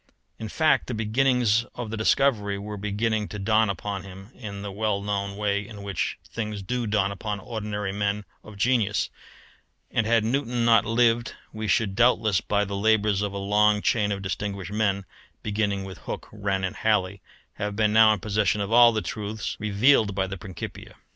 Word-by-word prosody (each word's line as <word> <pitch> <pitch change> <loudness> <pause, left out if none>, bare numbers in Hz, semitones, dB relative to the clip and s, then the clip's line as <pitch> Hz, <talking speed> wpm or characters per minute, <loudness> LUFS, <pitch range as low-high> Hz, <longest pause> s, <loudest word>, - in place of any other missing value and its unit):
In 110 - -5
fact 155 +2 +2
the 125 - -3
beginnings 115 0 +2
of 120 -3 -5
the - - -2
discovery 110 -3 +2
were 105 +1 -6
beginning 105 +1 -1
to 105 - -7
dawn 110 +2 +2
upon 100 +1 -3
him 95 +3 -12
in 100 -4 -7
the 100 - -5
well 105 0 -1
known 100 -1 -2
way 100 -1 0
in 105 -3 -10
which 100 -4 -2
things 105 -3 -5
do 120 +3 -2
dawn 100 -2 +1
upon 105 +1 -4
ordinary 105 -3 -4
men 100 +1 -1 0.2
of 110 -2 -12
genius: 105 -2 +1 0.8
and 115 -2 +1
had 115 -1 +3
Newton 120 0 0
not 115 -2 +5
lived 115 +1 +2 0.2
we 110 0 -4
should 100 -1 +1
doubtless, 110 -4 +3
by 105 0 0
the 100 0 -4
labours 105 -1 +2
of 105 -1 -1
a 100 - -5
long 105 +1 +3
chain 105 -3 +2
of 100 -1 -3
distinguished 100 0 -4
men, 100 -2 0 0.4
beginning 100 -2 -1
with 95 -3 -9
Hooke, - - -6
Wren, 100 -2 -2
and 95 - -3
Halley, 100 -3 0 0.4
have 105 0 -3
been 105 0 +2
now 110 0 +7
in 105 - 0
possession 105 0 0
of 100 +1 -2
all 120 0 +8
the 110 -3 -2
truths 105 +1 -4
revealed 105 0 +3
by 95 -1 +1
the 95 +1 -5
Principia. 95 -1 -8
105 Hz, 185 wpm, -25 LUFS, 100-110 Hz, 0.8 s, all